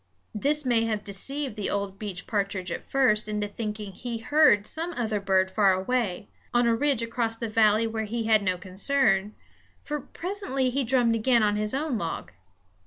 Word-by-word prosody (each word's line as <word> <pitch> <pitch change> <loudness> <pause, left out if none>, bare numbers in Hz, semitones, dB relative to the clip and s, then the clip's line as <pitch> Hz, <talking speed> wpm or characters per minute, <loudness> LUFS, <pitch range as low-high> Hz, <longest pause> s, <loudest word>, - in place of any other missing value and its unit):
This 285 +7 0
may 235 -2 +2
have 215 -2 -2
deceived 265 +6 -3
the 210 -2 -2
old 200 -1 -3
beech 195 -4 -6
partridge 195 -4 -2
at - - -3
first 215 -6 +2
into 210 -1 -1
thinking 210 -1 -5
that - - -18
he 240 -2 -4
heard 225 -4 +4
some 330 +8 -4
other 220 -6 -1
bird 190 -1 +2
far 195 -1 +4
away, 205 0 -1 0.3
on 240 0 +4
a 235 - +3
ridge 270 0 +1
across 230 -1 -1
the 230 - -3
valley 215 0 +3
where 220 -1 -2
he 230 +2 -3
had 220 -1 +4
no 185 -2 0
concern; 195 +2 +1 0.5
for 295 0 -3
presently 305 -5 -3
he 275 +2 0
drummed 245 -1 +3
again 230 +1 +3
on 205 -1 +2
his 210 +3 -1
own 280 -5 -1
log. 165 - -4
220 Hz, 185 wpm, -26 LUFS, 205-255 Hz, 0.5 s, heard